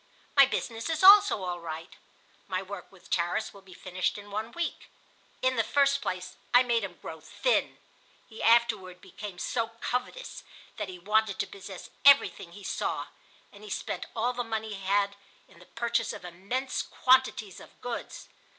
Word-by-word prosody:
"My 275 -1 +8
business 230 0 -3
is 320 +2 -1
also 400 - +8
all 175 -1 -3
right. 165 0 -7 0.5
My 185 -1 -2
work 195 -2 -9
with 195 -2 -19
Tarras 175 0 0
will 200 - -14
be 190 -2 -15
finished 185 +1 -2
in 205 0 -11
one 215 +3 -3
week. 345 -1 -4 0.5
In 255 -1 +2
the 225 - +4
first 280 +3 +3
place 185 0 -4 0.2
I 245 - +8
made 235 -3 +1
him 180 -4 -6
grow 160 -1 -8
thin. - - 0 0.5
He 225 - -10
afterward 220 -6 +3
became 205 0 -9
so 230 +5 -1
covetous 250 - -4 0.3
that 210 -3 -3
he 185 - -8
wanted 210 +2 +1
to - - 0
possess 195 -1 -10
everything 280 -10 +5
he 200 - -11
saw, - - -2 0.4
and 205 +1 -15
he 210 - -9
spent - - -4
all 240 +2 +1
the 245 0 -2
money 220 -1 -3
he 195 -1 -8
had 200 +1 +2 0.3
in - - -19
the 180 - -17
purchase 235 -1 -1
of - - -9
immense 200 +10 -3
quantities 255 -7 +2
of - - -16
goods. 245 -1 -6
210 Hz, 175 wpm, -29 LUFS, 185-245 Hz, 0.5 s, My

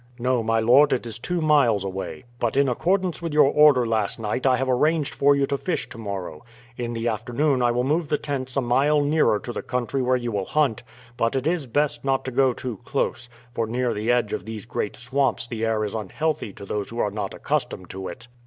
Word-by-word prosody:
"No, 125 0 +1
my 115 0 +1
lord; 125 +6 +5
it 125 - -1
is 115 0 -6
two 175 +7 -2
miles 140 -10 +3
away. 95 +5 -5 0.2
But, 120 +2 0
in 140 0 +4
accordance 180 +8 0
with 165 -3 -3
your 145 -2 +6
order 150 -5 +5
last 110 -3 0
night, 115 +4 -1
I 130 -1 +4
have 135 - -1
arranged 150 +3 +1
for 140 0 +4
you 140 0 +2
to 140 0 -2
fish 180 - -2
to 115 - -10
morrow. 95 -7 -5 0.3
In 120 -1 -4
the 115 0 -2
afternoon 125 +5 0
I 120 - +3
will 120 +1 +1
move 155 +4 0
the 150 - +1
tents 135 -3 -4
a - - +3
mile 140 +5 +3
nearer 145 -6 +3
to 120 +3 -7
the - - -4
country 125 +1 -2
where 130 0 +2
you 120 -1 -3
will 100 -3 -2
hunt, 140 -5 +1 0.4
but 115 +3 +1
it 135 0 -1
is 160 -4 0
best 145 +4 0
not 135 -1 0
to 130 - -3
go 130 +1 +3
too 120 -3 -6
close, 120 -2 -2 0.2
for 115 -2 -2
near 125 +2 0
the 110 +3 0
edge 120 -4 +1
of - - -3
these 110 +1 -7
great 105 -3 -3
swamps 125 -1 0
the 115 -2 -4
air 110 -1 +1
is 105 - -3
unhealthy 125 +5 -2
to 100 - -10
those 100 +1 -3
who 115 - -8
are 105 -3 0
not 100 -1 -4
accustomed 90 - -3
to 95 0 -6
it." 120 -1 -9
125 Hz, 235 wpm, -24 LUFS, 115-140 Hz, 0.4 s, your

